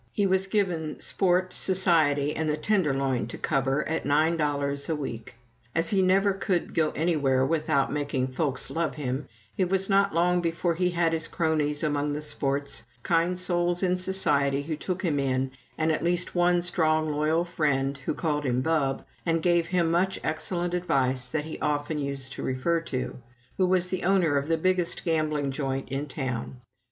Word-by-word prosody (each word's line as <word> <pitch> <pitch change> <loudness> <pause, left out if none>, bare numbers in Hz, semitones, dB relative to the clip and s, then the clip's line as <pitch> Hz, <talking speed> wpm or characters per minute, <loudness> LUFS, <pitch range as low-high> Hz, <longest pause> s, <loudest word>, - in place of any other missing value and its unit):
He 205 - +1
was 190 0 +1
given 180 -7 -1
sport, 185 -1 +1
society, 160 -7 +2
and 160 0 -1
the 150 - 0
tenderloin 135 - +1
to - - -7
cover, 135 +1 0
at 160 +1 -1
nine 155 +4 +2
dollars 140 -2 -1
a 160 - +1
week. 120 -6 -6 0.4
As 165 0 +2
he 195 -2 +3
never 195 +2 +3
could 190 -2 -1
go 160 -2 +2
anywhere 145 -6 +2
without 155 -2 +1
making 140 -3 -1
folks 130 0 -1
love 165 0 -1
him, 135 -1 -3 0.3
it 185 -2 +1
was 195 +1 0
not 200 0 +4
long 175 +1 +2
before 170 +1 0
he 180 +2 +1
had 170 -2 +1
his 160 -1 -1
cronies 155 -3 0
among 145 -1 0
the 150 +1 -4
"sports," 140 -3 -1 0.2
kind 170 +1 +1
souls 175 0 0
"in 180 -1 +2
society" 145 -7 +1
who 155 +1 -3
took 185 +4 -4
him 155 -6 +1
in, 130 -1 0 0.3
and 160 +1 +2
at 155 - -1
least 175 +1 0
one 175 0 +3
strong, 155 -3 +1
loyal 155 +3 +1
friend, 140 -5 0
who 135 - -3
called 150 -3 -1
him 125 -2 +1
"Bub," 140 -3 0 0.2
and 165 -1 0
gave 175 -2 +3
him 175 -3 +1
much 185 +3 +1
excellent 175 +2 -2
advice 135 -8 +1
that 150 +3 -2
he 160 - -7
often 150 +1 -1
used 140 -1 -3
to - - -6
refer 145 +6 0
to, 130 -6 -4 0.4
who 185 - +3
was 180 -1 +2
the 185 - -2
owner 180 -5 +3
of 140 - -6
the 165 0 +2
biggest 185 +1 0
gambling 155 -4 0
joint 135 -1 -3
in 135 +2 -3
town. 130 -3 -4
155 Hz, 180 wpm, -27 LUFS, 140-175 Hz, 0.4 s, not